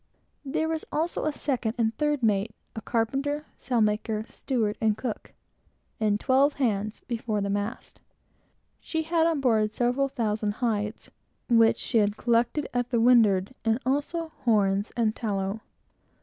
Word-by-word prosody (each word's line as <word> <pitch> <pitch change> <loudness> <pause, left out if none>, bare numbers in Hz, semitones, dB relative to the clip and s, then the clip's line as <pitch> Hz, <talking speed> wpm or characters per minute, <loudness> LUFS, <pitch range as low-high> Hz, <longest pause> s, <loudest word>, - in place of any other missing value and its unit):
There 310 +3 -1
was 320 -1 -2
also 320 +2 -1
a 310 - +1
second 250 -6 -2
and 225 -1 +1
third 295 -2 0
mate, 210 0 +1 0.2
a 220 - -5
carpenter, 275 +7 -1
sailmaker, 220 -2 0
steward, 220 -6 -2 0.2
cook, 240 -5 -4
etc., - - -30 0.6
and 210 -1 +1
twelve, 275 +3 +3
including 210 -6 +1
boys, 215 - -11
before 230 -3 -2
the 200 0 -1
mast. 205 +4 -4 0.8
She 320 -1 -3
had, 325 0 +2
on 320 -4 0
board, 220 -5 +2
seven 250 +4 +1
thousand 215 -4 -1
hides, 215 -2 -2 0.4
which 230 -1 +5
she 230 - +1
had 205 0 +1
collected 240 +5 +1
at 245 0 -1
the 240 -2 +1
windward, 225 -4 +4
and 225 0 +2
also 295 +5 -1
horns 205 -3 +2
and 220 -2 +1
tallow. 200 -1 -2
230 Hz, 150 wpm, -27 LUFS, 215-270 Hz, 0.8 s, which